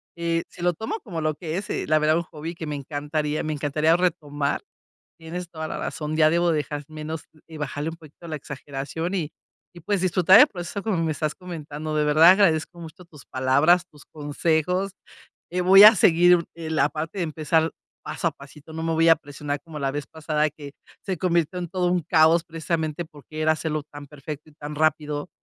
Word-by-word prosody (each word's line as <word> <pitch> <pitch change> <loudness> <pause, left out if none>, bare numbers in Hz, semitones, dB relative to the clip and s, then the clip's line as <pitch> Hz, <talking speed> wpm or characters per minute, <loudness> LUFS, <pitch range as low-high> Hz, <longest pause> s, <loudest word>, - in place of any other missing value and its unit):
Eh, 170 0 -1
sí, - - -14
lo 175 0 +2
tomo 220 - -4
como 170 -8 -5
lo 155 0 0
que 165 0 -4
es, 195 - -5
eh, - - -2
la 155 0 +4
verdad, 155 +1 +3
un 170 - -1
hobby 160 +1 -7
que 165 - -6
me 150 - -3
encantaría 150 +2 -3
me 155 - -2
encantaría 150 +3 +2
retomar, 145 -5 -1 0.6
tienes 170 +2 -6
toda 160 -1 -5
la - - -4
razón, 155 0 -4
ya 155 -1 +5
debo 170 +1 +2
dejar 150 -2 -2
menos 155 0 -6 0.2
y 160 - -11
bajarle 150 +2 -3
un 165 - -10
poquito 160 +1 -15
la 155 -2 -4
exageración, 145 +5 -5
y 160 -5 -2 0.4
y 175 - -11
pues 200 +3 -1
disfrutar 185 +2 +6
el 295 - +9
proceso 180 +1 -6
como 215 -5 -1
me 160 - 0
estás 150 +1 -2
comentando. 155 -4 -6
De 150 - +2
verdad 155 +4 +7
agradezco 175 -3 +2
mucho 165 +3 -11
tus 155 -4 -16
palabras, 140 +7 +3
tus 150 -3 -18
consejos, 160 +5 -1 0.6
eh, 180 +1 -1
voy 195 +3 +8
a 215 +1 +10
seguir, 175 0 +5
eh, 165 -1 -7
la 155 - +2
parte 160 +5 -5
de - - +1
empezar 160 +1 0 0.3
paso - - -2
a 165 - 0
pasito. 145 +2 -14
No 160 0 -4
me 165 - -1
voy 165 +1 +3
a 165 - +8
presionar 145 -1 -5
como 160 -3 -8
la 135 -1 0
vez 145 +1 -4
pasada, 155 -1 -1
que 145 -1 -11 0.3
se 190 -2 -3
convirtió 175 0 0
en 175 -2 -5
todo 180 -2 0
un 180 -1 +1
caos 160 +1 +4
precisamente 160 0 -3
porque 155 0 -9
era 155 0 +4
hacerlo 155 -1 -3
tan 145 0 -10
perfecto 150 +1 -9
y - - -22
tan 150 0 -8
rápido. 150 +1 0
160 Hz, 210 wpm, -24 LUFS, 150-170 Hz, 0.6 s, a